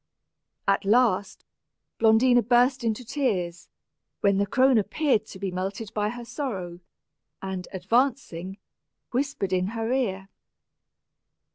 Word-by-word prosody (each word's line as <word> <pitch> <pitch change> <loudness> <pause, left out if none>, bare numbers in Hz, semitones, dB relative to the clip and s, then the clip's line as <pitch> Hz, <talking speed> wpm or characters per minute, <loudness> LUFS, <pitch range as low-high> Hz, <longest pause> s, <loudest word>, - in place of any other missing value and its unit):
At 195 0 +2
last, 205 -2 +2 0.5
Blondina 235 +2 +5
burst 245 +2 +3
into 230 +2 -2
tears, 185 - -2 0.5
when 200 -1 +3
the 200 - +1
crone 260 +2 +4
appeared 220 +1 0
to - - -10
be 195 -1 -3
melted 195 +4 -4
by 210 0 0
her 240 +1 -7
sorrow, 190 - -5 0.6
and, 190 -2 -5
advancing, 195 -2 -1 0.5
whispered 250 -7 -1
in 185 0 +1
her 225 +2 -1
ear. 195 -7 -1
215 Hz, 115 wpm, -26 LUFS, 190-250 Hz, 0.6 s, Blondina